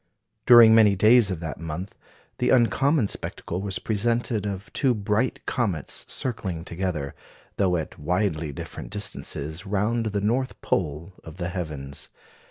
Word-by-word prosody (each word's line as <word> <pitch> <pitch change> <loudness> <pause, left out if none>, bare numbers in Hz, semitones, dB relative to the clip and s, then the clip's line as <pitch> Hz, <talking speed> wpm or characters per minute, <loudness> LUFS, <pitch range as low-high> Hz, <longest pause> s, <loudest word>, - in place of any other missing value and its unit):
During 120 -2 +9
many 110 -3 +6
days 110 +2 +5
of 90 -4 -4
that 80 -5 -5
month, 80 +4 -5 0.5
the - - +1
uncommon 130 +1 +3
spectacle 90 -2 -5
was 100 -1 -2
presented 115 0 0
of 100 0 -6
two 130 -4 +2
bright 105 +4 -1
comets 95 - -1
circling 95 -9 -2
together, 85 -6 -3 0.4
though 95 -3 +2
at 80 - -6
widely 80 -1 -1
different 70 - -8
distances, 90 -5 -4
round 110 +3 0
the 105 -1 -1
North 125 +6 -1
pole 80 +2 -2
of 80 +1 -11
the 85 -1 -3
heavens. 75 -6 -6
100 Hz, 140 wpm, -25 LUFS, 80-110 Hz, 0.5 s, During